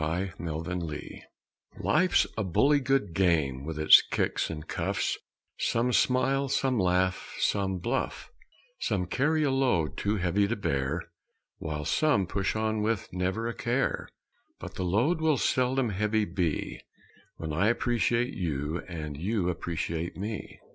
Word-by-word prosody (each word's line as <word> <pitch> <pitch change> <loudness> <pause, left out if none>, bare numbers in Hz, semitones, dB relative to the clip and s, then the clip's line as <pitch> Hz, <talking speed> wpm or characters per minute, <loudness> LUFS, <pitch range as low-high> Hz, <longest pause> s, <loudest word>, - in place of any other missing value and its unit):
_ - - 0 0.3
APPRECIATION 85 -1 -5 0.6
Life's 180 - +3
a 110 - -1
bully 140 - +3
good 135 -9 0
game 80 -8 +1
with 80 +1 -5
its 75 0 +8
kicks - - -1
and 80 -1 -6
cuffs - - -1 0.4
Some 120 +2 +1
smile, 135 +2 +2
some 130 -2 +1
laugh, 90 0 +1
some 95 -2 0
bluff; 120 +9 -3 0.5
Some 90 -3 0
carry 150 - +1
a 140 - +2
load 120 - +1
too 105 +1 0
heavy 100 +1 +1
to 120 - -1
bear 75 -4 -1 0.6
While 75 -2 -4
some 145 - +2
push 95 +3 -1
on 110 0 0
with 110 -4 -1
never 95 +5 -1
a 115 - -2
care, 120 +4 -1 0.5
But - - -8
the 95 - -3
load 125 - +2
will 155 -3 +3
seldom 130 0 +1
heavy 105 +2 +1
be 85 -4 -2 0.6
When 80 -2 -4
I 90 +7 +2
appreciate 120 +2 +1
you 80 -2 -2
and 75 -5 -5
you 90 +4 -1
appreciate 85 -1 -3
me. 105 +2 -5
100 Hz, 140 wpm, -28 LUFS, 85-120 Hz, 0.6 s, its